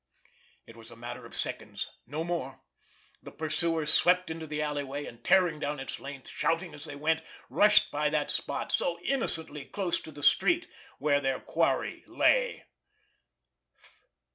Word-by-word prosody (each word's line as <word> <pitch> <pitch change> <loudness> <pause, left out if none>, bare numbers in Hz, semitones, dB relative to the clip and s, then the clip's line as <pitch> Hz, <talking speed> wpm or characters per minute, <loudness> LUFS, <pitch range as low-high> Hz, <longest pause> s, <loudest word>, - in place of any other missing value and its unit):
It 115 - -14
was 115 -1 -12
a 115 - -11
matter 120 +1 -7
of - - -6
seconds—no 150 +6 -2
more. 135 -6 -4 0.6
The - - -10
pursuers 160 0 0
swept 180 0 +4
into 160 0 -6
the 150 0 -3
alleyway, 145 -1 -2
and 115 - -11
tearing 175 -5 +4
down 145 -1 -2
its 135 - -5
length, 140 -1 -8
shouting 165 +2 -1
as 145 +1 -5
they 145 -2 -6
went, 160 +2 +1 0.3
rushed 210 +1 +5
by 150 +1 +1
that 150 -1 0
spot, - - -2
so 170 -1 0
innocently 165 - +1
close 185 +4 -2
to 160 - -10
the 145 -1 -10
street, 335 - +4 0.3
where 145 -1 +2
their 135 -1 0
quarry - - 0
lay. - - +2
150 Hz, 150 wpm, -29 LUFS, 145-170 Hz, 0.6 s, rushed